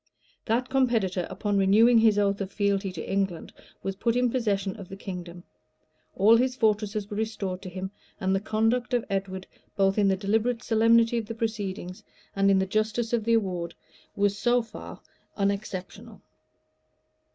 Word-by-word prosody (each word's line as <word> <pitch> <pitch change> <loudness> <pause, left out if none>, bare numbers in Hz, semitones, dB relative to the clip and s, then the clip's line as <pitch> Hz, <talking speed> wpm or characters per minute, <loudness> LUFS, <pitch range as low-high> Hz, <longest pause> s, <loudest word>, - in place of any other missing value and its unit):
That 240 +3 0
competitor, 230 -9 +1
upon 200 +2 -1
renewing 225 +5 +5
his 220 -2 +4
oath 200 0 +1
of 195 0 -4
fealty 200 -1 0
to 160 - -6
England, 195 -4 -2 0.3
was 195 0 -3
put 230 +2 0
in 250 -1 +2
possession 200 -6 -1
of 195 -4 -10
the 195 - -7
kingdom;[*] 180 -3 -7 0.7
all 210 +4 +6
his 255 +1 +1
fortresses 210 -3 0
were 205 -1 -6
restored 200 -4 -3
to 185 - -7
him;[] 190 +1 -6 0.3
and 190 0 0
the - - +1
conduct 225 +4 0
of 240 - 0
Edward, 190 -1 -3 0.3
both 195 +1 +2
in 200 - +4
the 190 -1 +2
deliberate 225 +4 0
solemnity 230 +1 +4
of 220 - -6
the 230 - -5
proceedings, 205 -5 -4 0.3
and 195 0 +3
in 195 - +5
the 190 - +2
justice 215 +4 -1
of 225 -3 +1
the 230 - +3
award, 180 -6 -1 0.4
was 200 0 +1
so 240 +3 +2
far 220 -2 -10 0.4
unexceptionable. 200 -2 -3
205 Hz, 165 wpm, -27 LUFS, 195-230 Hz, 0.7 s, all